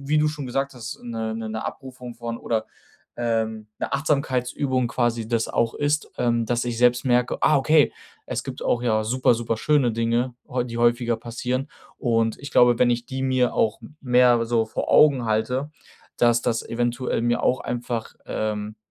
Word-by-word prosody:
wie 155 0 +3
du 150 - +3
schon 150 -3 -5
gesagt 135 +2 -2
hast, 115 -2 -7
'ne 110 -2 -4
'ne 110 -1 -5
’ne 110 0 -4
Abrufung 125 -2 -7
von 115 0 -5
oder, 110 -2 -2 0.5
ähm, 110 -2 -2
'ne - - -3
Achtsamkeitsübung 130 -3 0
quasi 120 -2 0
das 115 -2 0
auch 115 0 0
ist, 145 +1 -1
ähm, 120 -1 +1
das 120 +1 0
ich 120 -1 -2
selbst 125 +1 +3
merke: 125 0 +2
„Ah 155 - +5
okay, 150 +2 +4 0.4
es - - -3
gibt - - -6
auch 120 - +1
ja 110 -3 +2
super, 125 +2 +2
super 115 -1 -2
schöne 135 -2 +2
Dinge 115 +2 0
häu 125 -1 -1
die 120 -1 -6
häufiger 120 0 +2
passieren.“ 125 +4 -3 0.3
Und 115 -3 0
ich 140 +1 -8
glaube, 120 -2 +5
wenn 125 -1 +4
ich 120 0 -1
die 130 0 -4
mir 130 -2 +1
auch 110 0 +1
m 150 - -13
mehr 125 -2 +4
so 115 -1 +1
vor 110 - -3
Augen 140 -5 +5
halte, 125 +6 -1 0.5
dass 120 -1 +3
das 115 0 0
eventuell 120 0 -1
mir 120 0 +1
auch 130 - +2
einfach, 120 -2 -4
ähm, 105 0 -3
120 Hz, 185 wpm, -24 LUFS, 115-130 Hz, 0.5 s, Ah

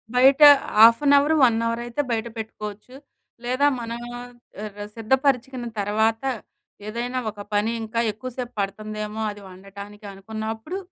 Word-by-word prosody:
బయట 270 +3 +5 0.4
half 230 +2 +8
an 285 - +5
hour, 290 +3 +3
1 235 -3 +5
hour 230 0 -2
అయితే 240 +4 -2
బయట 225 0 -1
పెట్టుకోవచ్చు, 215 +1 -7 0.5
లేదా 255 +4 +1
మనం 235 0 -5 0.2
ఆహ్, 245 0 -11 0.6
సిద్ధపరచుకున్న 255 +1 0
తర్వాత 220 +4 +1 0.6
ఏదైనా 240 +3 -3
ఒక 205 -1 -9
పని 210 +2 +1
ఇంకా 225 +1 -3
ఎక్కువసేపు 250 +2 -7
పడుతుందేమో 215 +2 -4
అది 205 - -12
వండటానికి 200 +3 -12
అనుకున్నప్పుడు. 220 - -6
225 Hz, 125 wpm, -23 LUFS, 210-250 Hz, 0.6 s, half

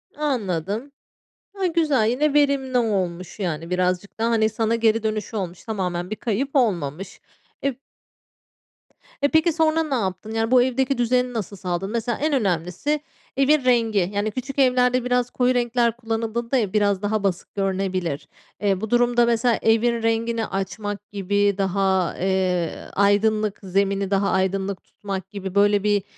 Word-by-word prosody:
Anladım. 220 - -2 0.6
A, 390 -2 -2
güzel 310 -9 +2
yine 290 +4 +1
verimli 275 -3 +2
olmuş 185 -5 -1
yani. 165 -3 -3
Birazcık 180 +3 -1
da, 230 +1 +1
hani, 220 -1 +3
sana 225 +1 0
geri 225 -1 +2
dönüşü 215 0 -3
olmuş 180 -2 -5
tamamen 180 -4 -3
bir 215 - -3
kayıp 250 +7 -2
olmamış. 180 - -1 0.4
Eb 275 -3 -1 1.5
Eee, 285 - +4
peki 320 +1 +3
sonra 320 0 +2
ne 285 -4 -2
yaptın? 195 0 -3
Yani 225 +1 -1
bu 250 -1 +6
evdeki 260 +1 0
düzeni 250 +1 +1
nasıl 210 -3 -4
sağladın? 185 +2 -3
Mesela 235 0 -1
en 305 0 0
önemlisi: 195 - 0 0.4
Evin 275 0 +3
rengi. 225 -7 +2
Yani 205 +1 -1
küçük 265 +4 -5
evlerde 250 -1 +3
biraz 250 0 +1
koyu 250 0 +2
renkler 240 -1 +1
kullanıldığında 230 +2 -2
ev 210 -5 -1
biraz 205 -2 +2
daha 205 0 -1
basık 185 -1 -2
görünebilir. 190 -5 -2 0.3
Eee, 195 -1 +1
bu 220 - -3
durumda 240 0 +3
mesela 235 0 +2
evin 230 +1 +2
rengini 225 0 0
açmak 205 +2 -5
gibi 200 0 +1
daha, 190 -2 +1
eee, 185 -3 0 0.2
aydınlık 205 +1 +2
zemini 195 +1 0
daha 195 0 +2
aydınlık 190 0 -1
tutmak 195 -2 -6
gibi 195 -2 -6
böyle 205 0 +4
bir, 205 -2 +2
215 Hz, 150 wpm, -23 LUFS, 195-245 Hz, 1.5 s, bu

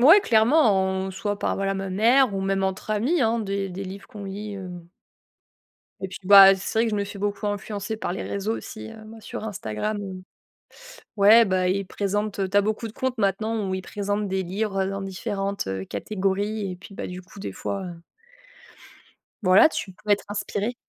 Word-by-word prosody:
ouais, 325 +11 +8
clairement, 230 - +4
on 190 0 -1
soit 205 +1 -3
par, - - 0
voilà, 195 0 -1
ma 195 0 -4
mère 230 +3 +4
ou 195 - -1
même 195 0 0
entre 190 +2 -3
amis, 255 +11 +1
hein, 230 0 +2
des 200 -2 -2
des 190 +2 -6
livres 195 +1 -9
qu'on 205 -2 -9
lit, 200 +1 -6
heu 190 -2 -7 1.3
et 190 - -2
puis, 185 - -8
bah, 195 0 +10
c'est 190 +3 -3
vrai 230 - +3
que - - 0
je 210 - -1
me 200 - 0
fait 200 0 -8
beaucoup 205 +1 -2
influencer 205 +1 -3
par 215 - -3
les 190 - -4
réseaux 200 +3 -2
aussi, 110 0 -8
heu, 220 - -12
moi, 220 +1 -12
sur 215 - -7
Instagram, 205 - -3
heu, 190 -2 -7 1.0
ouais, 215 +4 +8
bah 185 -2 +1
ils 195 +2 0
présentent, 205 +1 -2
heu 195 - +1
tu 200 - -5
as 205 - +7
beaucoup 215 +2 -2
de 215 - -9
comptes 260 -1 -2
maintenant 215 +1 0
où 190 - -2
ils 190 - -2
présentent 205 +1 -2
des 190 0 -1
livres, 195 +2 -2
heu, 190 - -2
dans 195 - -4
différentes, 195 +1 -3
heu, 95 0 -3
catégories, 200 - -2
et - - -6
puis, 180 +3 -13
bah, - - -5
du 180 0 -7
coup, 190 - -14
des 195 - -5
fois, 195 -1 -4
heu 170 -2 -9 1.4
voilà, 185 +7 +7
tu 195 -10 -5
peux 210 +3 -8
être 205 - +3
inspiré. 205 +2 -3
200 Hz, 210 wpm, -24 LUFS, 190-215 Hz, 1.4 s, bah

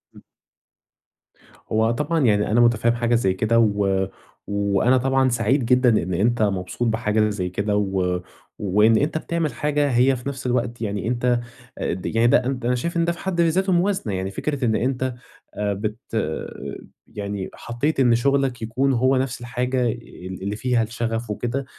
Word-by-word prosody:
امم. - - -15 1.5
هو 110 +1 +2
طبعًا 150 +7 0
يعني 105 -2 +2
أنا 120 +2 +4
متفهّم 120 0 +3
حاجة 120 0 +1
زي 95 -5 +2
كده، 110 +4 +2
و 100 -3 +2 0.4
وأنا 100 +5 +2
طبعًا 135 +1 +2
سعيد 120 +3 +1
جدًا 125 +1 +4
إن 90 +2 -3
أنت 110 +6 +1
مبسوط 100 +3 -1
بحاجة 110 -1 +1
زي 95 -3 -3
كده 100 +3 -1
و 95 -3 0 0.4
وإن 105 +3 +4
أنت 150 +5 0
بتعمل 165 -1 -2
حاجة 145 -1 0
هي 130 +2 +4
في 125 +2 -5
نفْس 135 -2 -7
الوقت 120 -1 -1
يعني 100 -2 -2
أنت 120 0 +1 0.4
أ - - -1
د 90 +1 -7
يعني 115 +1 +2
ده 120 +1 +4
أنت 130 -2 -2
أنا 125 +1 +2
شايف 170 +8 -3
إن 170 - +2
ده 170 - +1
في 170 - -8
حد 185 -3 -1
ذاته 185 +4 +2
موازنة، 180 - 0
يعني 95 +1 -3
فكرة 140 +5 -2
إن 110 -2 +2
أنت 130 +1 -1 0.4
آآ 105 -1 -1
بت 105 +2 -3 1.1
يعني 100 -2 -5
حطيت 125 +6 -2
إن 120 -3 +5
شغلك 135 0 +1
يكون 130 +5 0
هو 130 +2 +3
نفْس 130 -1 -2
الحاجة 125 +1 -1
ال 95 -5 -9
اللي 100 +2 -2
فيها 120 +1 +1
الشغف 115 0 -3
وكده، 120 +6 -2
120 Hz, 175 wpm, -23 LUFS, 105-130 Hz, 1.5 s, إن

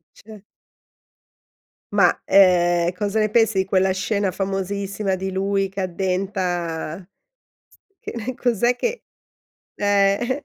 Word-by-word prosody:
Cer 215 -2 -14 1.5
Ma 195 -4 +5 0.2
ehm 175 -3 +4
cosa 210 +1 -1
ne 215 - +1
pensi 225 -2 +2
di 190 - +1
quella 190 0 +2
scena 195 +1 -1
famosissima 195 +1 -3
di 190 +1 -4
lui 195 0 0
che 195 0 -5
addenta 180 -2 -3 0.9
che 235 +2 -6
cos'è 240 0 +1
che 480 - -3 0.7
eh. 205 +7 +1
195 Hz, 105 wpm, -22 LUFS, 185-210 Hz, 1.5 s, Ma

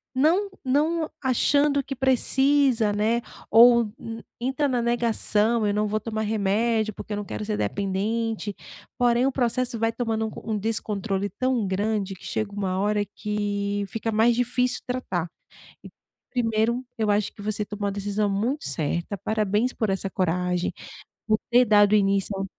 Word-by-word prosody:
não 340 +9 +3 0.2
não 310 +5 +1 0.2
achando 285 +2 +2
que 275 - -5
precisa, 265 -2 +3
né. 220 +3 +1 0.3
Ou 235 -1 +7 0.5
entra 265 +4 0
na 250 -3 0
negação. 230 -2 +1
Eu 205 - +1
não 210 0 +1
vou 215 +1 -1
tomar 220 0 -3
remédio, 215 +1 +1
porque 215 - -7
eu 205 - -2
não 205 - -3
quero 210 - -5
ser 215 0 -1
dependente. 205 +2 -2 0.4
Porém, 245 +1 +3
o 275 - +1
processo 245 -1 0
vai 225 0 +1
tomando 225 -2 -2
um - - -3
co - - -9
um 215 - 0
descontrole 205 -2 -1
tão 255 -5 0
grande 200 0 -1
que 185 - -15
chega 215 -2 -2
uma 190 -2 -2
hora 205 +1 +1
que 205 -1 -2
fica 225 +3 -3
mais 225 +2 +3
difícil 250 +1 0
tratar 185 -9 -2 0.5
e - - -10 0.4
primeiro 235 0 0
eu 220 -2 0
acho 205 0 +1
que 205 - -11
você 210 0 -1
tomou 205 0 -4
uma - - 0
decisão 205 +1 -1
muito 235 +9 -1
certa. 170 +7 -2
Parabéns 215 +4 0
por 220 -4 -1
essa 195 0 -1
coragem 180 -1 -1 0.6
por 215 0 +2
ter 245 +1 +5
dado 210 -1 +5
início 195 -1 +2
ao 195 - -2
220 Hz, 160 wpm, -25 LUFS, 205-245 Hz, 0.6 s, Ou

